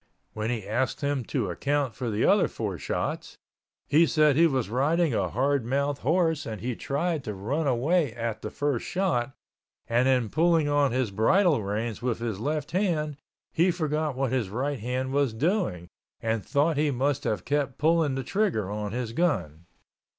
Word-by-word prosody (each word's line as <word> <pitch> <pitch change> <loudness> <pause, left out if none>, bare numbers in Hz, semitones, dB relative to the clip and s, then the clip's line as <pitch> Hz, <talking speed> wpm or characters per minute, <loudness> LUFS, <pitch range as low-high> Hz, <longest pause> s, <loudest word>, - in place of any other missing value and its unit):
When 110 +1 -3
he 110 -5 -3
asked 120 +6 -1
him 140 -2 0
to 110 -10 -2
account 140 +5 -1
for 125 -3 -4
the 105 -1 0
other - - +4
four - - -4
shots, - - -3 0.5
he 160 +4 +5
said 150 -3 +4
he 165 +3 +6
was 130 -6 -1
riding 145 - +1
a - - 0
hardmouth 140 +2 0
horse 160 0 +1
and 110 -2 -5
he 120 +4 -3
tried 155 +4 -2
to 105 - -5
run 135 +11 -2
away 140 +4 +2
at 115 -2 -4
the - - -4
first 145 -5 -1
shot, 135 -10 -1 0.5
and 120 +2 +2
in 125 -4 +2
pulling 165 +1 +3
on 145 -2 +2
his 125 -3 0
bridle 150 - +3
reins 105 +2 -3
with 120 -2 -1
his 115 -4 -4
left 145 +3 -2
hand 160 -6 0 0.4
he 170 +3 +3
forgot 155 -4 -1
what 135 -1 -1
his 125 -7 0
right 135 +6 -2
hand 130 +4 -2
was 140 -5 +1
doing, 135 - 0 0.3
and 110 -2 -1
thought 150 +2 +1
he 150 0 +2
must 140 +1 0
have 105 - -2
kept 145 -2 -1
pulling 160 -2 +2
the 135 - -3
trigger 165 - 0
on 105 -1 -4
his 120 -2 -3
gun. 85 - -1
135 Hz, 180 wpm, -27 LUFS, 115-155 Hz, 0.5 s, he